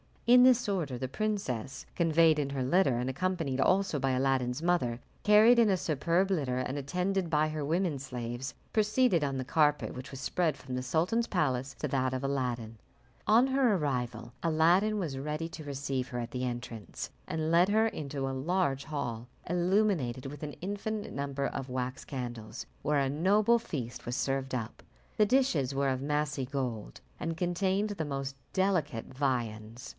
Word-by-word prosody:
In 245 +1 +7
this 250 -3 +5
order 160 -10 -1
the 130 +1 -4
princess, 135 - -3
conveyed 165 -2 +4
in 140 -1 -1
her 135 -2 -1
litter, 135 -2 +3
and 125 +2 -1
accompanied 165 -2 -1
also 185 0 +2
by 135 0 +1
Aladdin's 130 0 +1
mother, 165 -9 +1 0.2
carried 220 +3 +7
in 225 -2 +5
a 195 - +4
superb 170 +4 +1
litter 135 -9 0
and 130 +2 -2
attended 180 +5 -1
by 155 -1 +2
her 155 -2 -3
women 165 -1 0
slaves, 125 -1 -5 0.2
proceeded 215 -5 +3
on 135 -1 -2
the 130 - -2
carpet 150 +2 +2
which 130 0 -8
was 135 -1 -8
spread 160 +1 0
from 130 -1 -8
the 125 - -1
sultan's 170 - +1
palace 135 -6 0
to 150 - -1
that 130 -1 0
of 130 +1 -3
Aladdin. 125 -5 -2 0.5
On 230 +5 +6
her 260 -5 +3
arrival 125 - -2
Aladdin 175 +7 +3
was 160 -9 -3
ready 150 +3 -3
to 160 -2 -9
receive 135 -2 -3
her 125 - -5
at 120 -1 -5
the 130 0 -2
entrance, 120 -3 -6 0.2
and 160 0 -1
led 170 +2 +5
her 220 +2 +4
into 140 -8 -4
a - - -2
large 140 0 0
hall, 120 -6 -4 0.2
illuminated 175 - +1
with 145 +1 -8
an 150 -1 -4
infinite 205 +3 -3
number 140 0 -2
of 135 -1 -4
wax 130 +1 -3
candles, 120 -4 -6 0.2
where 150 0 +2
a 135 -1 +1
noble 205 +10 +3
feast 130 - -6
was 120 - -2
served 135 -1 -1
up. 115 -2 -5 0.4
The 215 - +5
dishes 190 - +2
were 140 0 +2
of 130 0 -1
massy 145 -1 -1
gold, 125 - -4 0.2
and 165 - -2
contained 190 +4 0
the 170 -6 -3
most 135 -1 -4 0.2
delicate 165 - 0
viands. 120 -4 -2
145 Hz, 175 wpm, -30 LUFS, 130-180 Hz, 0.5 s, In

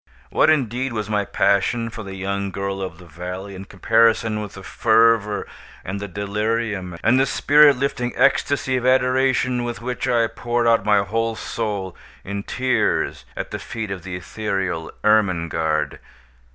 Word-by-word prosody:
What, - - +4
indeed, 130 -3 +1
was 105 -1 -3
my 105 -1 +1
passion 105 +5 +1
for 115 -1 -7
the 95 -2 -7
young 100 +1 -2
girl 95 +1 -4
of 95 - -5
the 90 - -14
valley 90 +4 -7
in 95 +1 -8
comparison 110 +2 +2
with 105 -1 -8
the 95 - -10
fervor, 110 -1 +2 0.4
and 95 +2 -4
the 100 - -5
delirium, 100 -1 -2
and 120 +4 +4
the 135 - +3
spirit 145 0 +5
lifting 125 -2 -1
ecstasy 140 -1 +2
of 125 - -3
adoration 130 -1 +2
with 120 -1 -4
which 125 +2 -3
I 120 -1 +3
poured 120 +1 -2
out 115 -3 +4
my 105 -1 +3
whole 115 +2 -1
soul 105 -5 -4 0.3
in 100 +1 -4
tears 130 +5 0
at - - -5
the - - -4
feet 110 -4 -5
of 95 -2 -5
the 90 -1 -6
ethereal 95 -3 -3
Ermengarde? 85 -7 +1
105 Hz, 160 wpm, -22 LUFS, 95-120 Hz, 0.4 s, spirit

